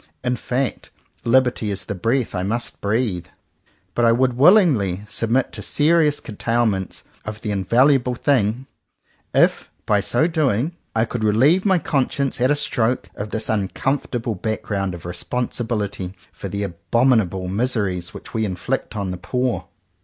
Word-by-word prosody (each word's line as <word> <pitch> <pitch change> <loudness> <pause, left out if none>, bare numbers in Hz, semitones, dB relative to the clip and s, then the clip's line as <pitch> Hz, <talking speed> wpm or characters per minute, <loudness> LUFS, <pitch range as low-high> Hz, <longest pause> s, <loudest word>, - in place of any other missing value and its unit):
In 125 0 +1
fact 125 +2 -2 0.3
liberty 125 -3 +2
is 100 0 -3
the 100 - -3
breath 115 +6 0
I 90 - -1
must 115 +6 -3
breathe. 100 -4 -1 0.7
But 120 - 0
I 115 - +6
would 125 +2 +2
willingly 130 - +4
submit 115 +5 0
to - - -7
serious 155 -1 +3
curtailment 110 -3 -1 0.2
of 110 +1 -7
the 105 - -3
invaluable 125 +6 +3
thing, 120 -2 +1 0.7
if - - +2 0.2
by 105 -1 +3
so 125 +9 +2
doing 155 -2 0 0.2
I 110 0 +3
could 120 -1 -4
relieve 135 - +4
my 190 -2 +4
conscience 140 -4 0
at 130 - +4
a 145 - +4
stroke 125 -3 0
of 105 +1 -6
this 110 +1 -2
uncomfortable 120 +3 -1
background 100 -2 -2
of 85 - -11
responsibility 105 -2 -3 0.2
for - - -7
the 100 0 -3
abominable 100 0 +1
miseries 100 -4 -1
which - - -10
we 110 - 0
inflict 95 0 -3
on 100 -3 -2
the 90 - -4
poor. 125 +5 -2
115 Hz, 145 wpm, -21 LUFS, 100-130 Hz, 0.7 s, I